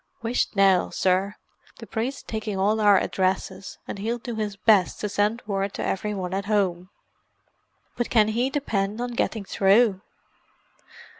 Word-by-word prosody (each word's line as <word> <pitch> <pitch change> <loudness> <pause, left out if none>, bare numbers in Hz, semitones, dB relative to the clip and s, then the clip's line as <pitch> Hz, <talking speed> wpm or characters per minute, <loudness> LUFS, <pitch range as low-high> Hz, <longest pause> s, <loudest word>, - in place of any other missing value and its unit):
"Whisht 230 -1 -1
now, 195 -2 +4
sir: 190 +2 0 0.4
the - - -9
priest's 240 +5 -4
taking 215 -2 -4
all 210 +3 +1
our 205 -2 +6
addresses, 190 0 -2
and - - -6
he'll 230 +4 -2
do 240 0 -6
his 210 -2 -3
best 205 -3 +3
to 210 - -2
send 210 +4 0
word 195 -1 -2
to - - -3
every 210 +2 -2
one 185 -2 -4
at 195 +1 -2
home." 190 -4 0 1.1
"But 240 - -1
can 215 -2 +4
he 240 +4 0
depend 215 -7 -2
on 245 0 -3
getting 225 -3 -2
through?" 195 +1 +3
205 Hz, 155 wpm, -25 LUFS, 195-225 Hz, 1.1 s, our